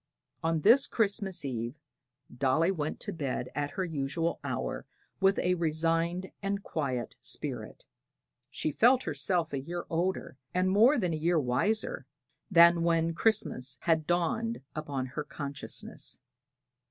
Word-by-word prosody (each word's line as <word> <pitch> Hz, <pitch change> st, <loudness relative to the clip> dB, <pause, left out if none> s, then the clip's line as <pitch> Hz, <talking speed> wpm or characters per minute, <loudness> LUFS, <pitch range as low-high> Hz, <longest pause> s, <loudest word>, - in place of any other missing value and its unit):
On 165 Hz, -1 st, 0 dB
this 240 Hz, -, +6 dB
Christmas 200 Hz, -6 st, +1 dB
Eve 120 Hz, -1 st, -3 dB, 0.6 s
Dolly 140 Hz, +8 st, +2 dB
went 155 Hz, -5 st, -3 dB
to 205 Hz, -, -3 dB
bed 135 Hz, -6 st, -3 dB
at 145 Hz, 0 st, -1 dB
her 185 Hz, +5 st, -2 dB
usual 160 Hz, +1 st, -2 dB
hour -, -, -3 dB, 0.3 s
with 195 Hz, 0 st, +4 dB
a 180 Hz, -, +2 dB
resigned 165 Hz, +2 st, 0 dB
and 200 Hz, 0 st, -2 dB
quiet 130 Hz, -7 st, -3 dB
spirit. -, -, -5 dB, 0.6 s
She 155 Hz, +2 st, -2 dB
felt 250 Hz, -, +4 dB
herself 160 Hz, +2 st, -1 dB
a 140 Hz, -, 0 dB
year 175 Hz, +5 st, -5 dB
older, 170 Hz, -5 st, -1 dB, 0.2 s
and 185 Hz, +1 st, +2 dB
more 230 Hz, +9 st, +6 dB
than 180 Hz, -7 st, 0 dB
a -, -, -1 dB
year 165 Hz, +2 st, +2 dB
wiser, 210 Hz, -, 0 dB, 0.4 s
than 170 Hz, -2 st, +7 dB
when 165 Hz, 0 st, +2 dB
Christmas 160 Hz, -, +1 dB
had 165 Hz, -2 st, +3 dB
first 155 Hz, -, -15 dB
dawned 180 Hz, +7 st, 0 dB
upon 145 Hz, -4 st, -3 dB
her 140 Hz, +4 st, -5 dB
consciousness. 140 Hz, -2 st, -5 dB
165 Hz, 140 wpm, -30 LUFS, 145-190 Hz, 0.6 s, than